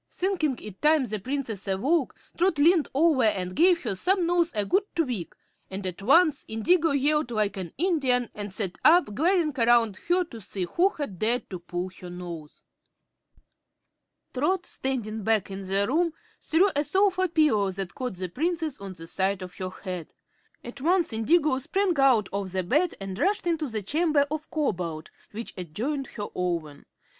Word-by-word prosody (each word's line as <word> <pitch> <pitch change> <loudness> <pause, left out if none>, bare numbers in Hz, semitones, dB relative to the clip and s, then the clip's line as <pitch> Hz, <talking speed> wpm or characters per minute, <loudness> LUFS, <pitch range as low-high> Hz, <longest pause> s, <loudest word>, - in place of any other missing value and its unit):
Thinking 340 -8 -1
it 210 -3 -10
time 300 -2 +4
the 215 -2 -3
Princess 235 -3 -4
awoke, 260 - +1 0.2
Trot 350 -2 +2
leaned 320 +2 +4
over 300 -3 +4
and 185 -4 0
gave 350 +1 +4
her 230 - -1
snubnose 350 - +1
a 205 -1 0
good 385 - +3
tweak, 250 - -2 0.3
and 190 +1 -6
at 185 0 -4
once 310 - +4
Indigo 325 +10 +2
yelled 285 -1 +1
like 215 -3 0
an 185 -4 -6
Indian 270 - +1
and 205 -1 -5
sat 190 -2 -3
up, 335 -8 +5
glaring 325 - +2
around 230 -3 +4
her 360 +1 +3
to 235 -10 -11
see 190 -1 -4
who 345 - +2
had 285 - -6
dared 235 +3 0
to 185 - -5
pull 175 +1 -5
her 180 - -9
nose. 175 -4 -9 1.7
Trot, 360 +8 0
standing 225 -5 -3
back 215 -2 +1
in 195 +1 -5
the 195 +1 +1
room, 330 +4 +1 0.3
threw 370 +5 +3
a 290 - +2
sofa 375 +2 +2
pillow 305 - +2
that 190 0 -5
caught 250 -6 -4
the 185 0 -4
Princess 320 - -2
on 195 -1 -6
the 165 -2 -10
side 190 +2 -1
of 180 - -10
her 185 -1 -3
head. 180 -3 -7 0.5
At 245 +3 -9
once 340 -2 +2
Indigo 280 +4 +2
sprang 370 +7 0
out 250 -7 +4
of 200 -2 -3 0.2
bed 315 - +2
and 195 -1 -6
rushed 400 0 +1
into 325 -3 0
the 220 -4 -3
chamber 300 - +2
of 310 0 -4
Cobalt, 175 - -2 0.2
which 230 +3 -6
adjoined 235 - -3
her 205 -2 -6
own. 165 -5 -3
250 Hz, 170 wpm, -26 LUFS, 195-325 Hz, 1.7 s, up